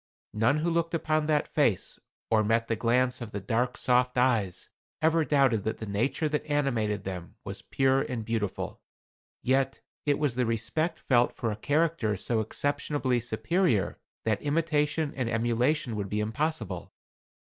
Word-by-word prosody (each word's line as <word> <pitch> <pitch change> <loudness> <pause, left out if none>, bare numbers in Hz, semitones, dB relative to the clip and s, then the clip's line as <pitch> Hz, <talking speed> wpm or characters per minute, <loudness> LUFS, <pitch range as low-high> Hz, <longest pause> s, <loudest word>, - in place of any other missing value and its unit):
None 115 +7 +3
who 165 +3 0
looked 165 0 0
upon 155 -1 0
that 150 -2 +2
face 120 - +1 0.3
or 110 -1 +4
met 115 +2 +1
the 115 - 0
glance 125 +3 +1
of 115 -3 -6
the 100 - -3
dark 120 +5 -1
soft 125 0 +2
eyes 115 -8 +1 0.3
ever 160 +1 +3
doubted 135 -8 +3
that 110 - -2
the 110 - -6
nature 115 +10 0
that 150 0 -1
animated 120 -9 0
them 90 -3 -6
was - - -5
pure 135 0 +2
and 115 -5 -3
beautiful. 110 -3 -3 0.6
Yet 135 +1 +1 0.3
it 145 - +3
was 145 -5 0
the 125 -1 0
respect 115 +9 -1
felt 120 -2 +2
for 115 -3 -2
a - - -3
character 145 -3 +1
so 110 +4 0
exceptionably 140 +2 0
superior 115 - 0 0.3
that 110 -2 +1
imitation 150 0 0
and 130 -4 -1
emulation 120 +3 +1
would 100 -2 -3
be 105 - -1
impossible. 110 - -2
125 Hz, 160 wpm, -28 LUFS, 110-150 Hz, 0.6 s, or